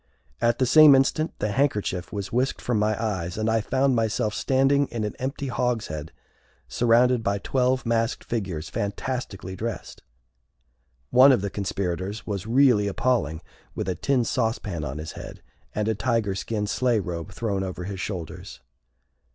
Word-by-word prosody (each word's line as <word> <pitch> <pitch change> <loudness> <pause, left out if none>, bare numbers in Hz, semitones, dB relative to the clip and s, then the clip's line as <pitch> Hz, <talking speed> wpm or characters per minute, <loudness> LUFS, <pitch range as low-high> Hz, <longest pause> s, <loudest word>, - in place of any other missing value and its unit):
At 120 0 +2
the 130 - +2
same 150 +2 +8
instant 150 +4 +2
the 105 - -1
handkerchief 105 -8 0
was 100 -2 -5
whisked 130 +3 0
from 120 -3 -1
my 105 +1 +1
eyes, 95 -6 -2
and 110 0 -1
I 110 0 +2
found 130 +3 +1
myself 110 -1 0
standing 135 +3 +2
in 115 -2 -4
an 105 - -3
empty 135 +2 -4
hogshead 115 - -2 0.6
surrounded 120 +1 +3
by 100 -2 0
twelve 130 +3 0
masked 115 0 0
figures 95 -9 -3
fantastically 100 -1 -4
dressed. 115 +2 -5 1.1
One 130 +3 +8
of 125 - +3
the 100 -1 -3
conspirators 95 +1 -3
was 100 -1 -4
really 120 -4 +4
appalling 100 - 0 0.3
with - - -3
a 95 - 0
tin 130 +6 +1
sauce 115 -1 0
pan 85 -6 -5
on 65 0 -4
his 80 0 -6
head, - - -10 0.3
and 105 0 0
a 110 - +2
tiger 115 -2 0
skin 105 +2 -2
sleigh 120 +2 +1
robe 85 -4 -5
thrown 100 -4 -2
over 95 -1 -5
his 95 +1 -5
shoulders. 90 -4 -6
110 Hz, 160 wpm, -25 LUFS, 95-125 Hz, 1.1 s, same